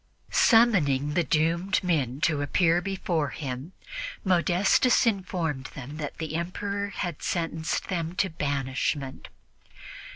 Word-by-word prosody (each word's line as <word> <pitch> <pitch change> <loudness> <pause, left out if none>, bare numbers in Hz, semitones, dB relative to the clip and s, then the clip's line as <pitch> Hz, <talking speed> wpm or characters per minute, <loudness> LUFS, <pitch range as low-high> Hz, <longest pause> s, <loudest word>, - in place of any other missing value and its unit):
Summoning 200 - +4
the 175 - +2
doomed 170 +6 +1
men 145 -7 0
to 155 -4 +2
appear 165 +4 +2
before 180 -5 -1
him, 135 +5 -6 0.5
Modestus 190 +7 +3
informed 180 - -1
them 140 +3 -7
that 150 -2 -5
the 160 -1 -4
Emperor 200 +4 -2
had 175 -5 -4
sentenced 165 -2 -2
them 170 -3 -2
to 190 - +2
banishment. 140 -3 -2
165 Hz, 110 wpm, -27 LUFS, 145-185 Hz, 0.5 s, Summoning